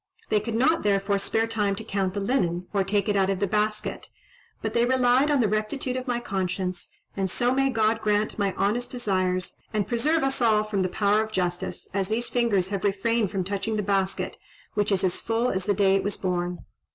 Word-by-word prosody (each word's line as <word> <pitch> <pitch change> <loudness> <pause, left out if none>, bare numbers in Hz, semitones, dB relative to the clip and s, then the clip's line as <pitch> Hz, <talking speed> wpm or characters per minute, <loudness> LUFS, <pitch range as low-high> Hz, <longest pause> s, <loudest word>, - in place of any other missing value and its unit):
They 210 - +3
could 225 +2 -4
not, 315 +8 +3
therefore, 200 0 +1
spare 225 +3 0
time 210 -3 0
to 220 - -7
count 195 -3 -2
the - - 0
linen, 185 -6 0
or 200 -1 +2
take 200 +2 0
it 205 - +1
out 195 -1 +3
of 195 -1 0
the 200 - +2
basket 210 +1 -1 0.5
but - - -3
they 235 - +3
relied 255 +2 +3
on 285 -3 +3
the 220 - +3
rectitude 215 +5 -2
of 255 +1 -4
my 240 -1 0
conscience; 185 -4 -3 0.3
and 195 -1 -1
so 245 +7 +1
may 270 +1 +2
God 225 -2 +1
grant 210 0 0
my 200 -1 +1
honest 235 +5 0
desires, 185 -6 -1
and 210 -2 -1
preserve 295 +7 +1
us 270 -1 -1
all 215 -2 +4
from 210 -2 -1
the 185 - 0
power 205 +2 +2
of 220 - -7
justice, 180 -3 -2
as 195 -1 0
these 230 +3 -1
fingers 210 -7 +1
have 200 -2 -3
refrained 205 +2 +1
from 195 -2 -2
touching 200 +3 -2
the 210 - -1
basket, 195 -1 -1 0.3
which 210 0 0
is 195 -1 +1
as 185 -2 0
full 230 +2 0
as 190 -1 -2
the 205 - +2
day 195 0 +4
it - - -2
was 205 0 -2
born." 180 -1 -2
210 Hz, 220 wpm, -26 LUFS, 195-230 Hz, 0.5 s, all